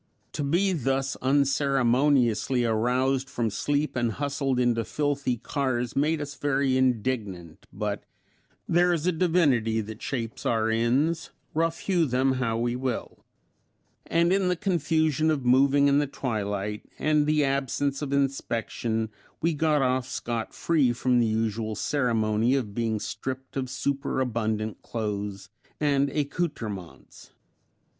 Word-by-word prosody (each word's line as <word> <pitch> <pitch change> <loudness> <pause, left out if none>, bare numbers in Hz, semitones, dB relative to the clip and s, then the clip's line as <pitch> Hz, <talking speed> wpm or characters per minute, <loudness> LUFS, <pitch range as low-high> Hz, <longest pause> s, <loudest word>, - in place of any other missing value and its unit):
To 150 - -3
be 180 +7 +2
thus 135 -3 0
unceremoniously 135 -2 +2
aroused 125 +4 +1
from 115 -5 -1
sleep 145 +8 -1
and 120 -3 0
hustled 140 -1 -1
into 120 -2 +2
filthy 140 -1 -1
cars 125 -1 -2
made 150 +3 +2
us 145 -1 -5
very 140 -2 +1
indignant, 110 -9 -1
but 105 0 -3 0.6
"There 175 +1 +3
is 165 -1 -2
a 180 - +3
divinity 150 -10 +2
that 110 +2 -6
shapes 115 -4 -4
our 115 -1 +1
ends; 130 +9 +1 0.2
rough 165 +1 0
hew 175 -5 +2
them 130 +1 +2
how 115 -3 0
we 120 +1 0
will," 125 -1 -4 0.8
and 170 +2 +3
in 195 -1 +2
the 180 - +2
confusion 160 -4 +1
of 145 -5 0
moving 140 +3 +5
in 140 0 +4
the 145 - 0
twilight, 105 -5 -3 0.2
and 150 -1 +2
the 150 -1 +3
absence 140 +1 0
of 145 -2 -3
inspection 115 -5 -1 0.3
we 165 +1 +1
got 150 -2 +2
off 130 0 +1
scot 115 -2 -3
free 145 -8 +2
from 125 +1 +2
the 115 - +3
usual 110 0 -1
ceremony 115 -3 +1
of 115 -7 -2
being 110 -1 -1
stripped 130 +4 -5
of 130 -2 -2
superabundant 120 -6 -2
clothes 100 -3 -4 0.3
and 140 -2 +2
accouterments. 135 - -4
130 Hz, 135 wpm, -26 LUFS, 115-145 Hz, 0.8 s, moving